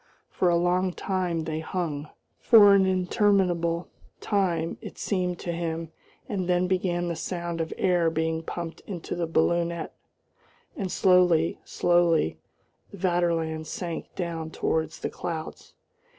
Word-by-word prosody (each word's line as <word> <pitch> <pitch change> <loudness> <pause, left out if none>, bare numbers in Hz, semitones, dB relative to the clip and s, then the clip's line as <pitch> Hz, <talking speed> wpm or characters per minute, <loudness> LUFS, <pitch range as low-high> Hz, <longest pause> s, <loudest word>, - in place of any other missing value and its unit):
For 180 - +2
a 170 - +3
long 180 +1 +1
time 180 -4 -1
they 160 0 -3
hung, 160 -3 -3 0.3
for 205 -4 +7
an 195 -1 +5
interminable 180 -3 +1 0.3
time 175 -6 0
it - - -9
seemed 180 -3 -1
to 175 - -3
him, 165 -1 -3 0.4
and 185 -4 -2
then 180 0 +3
began 180 -1 0
the 170 - -2
sound 170 0 -3
of 160 - -3
air 175 -3 +2
being 160 0 -1
pumped 170 0 -6
into 180 -5 -5
the 170 -1 -2
balloonette, 170 +1 0 0.8
and 190 -3 -3
slowly, 180 -3 +3
slowly 170 - +2 0.5
the 200 - -11
Vaterland 170 -3 0
sank 170 0 -5
down 165 -3 -3
towards 160 0 -1
the - - -2
clouds. 160 -2 -6
175 Hz, 135 wpm, -26 LUFS, 165-185 Hz, 0.8 s, for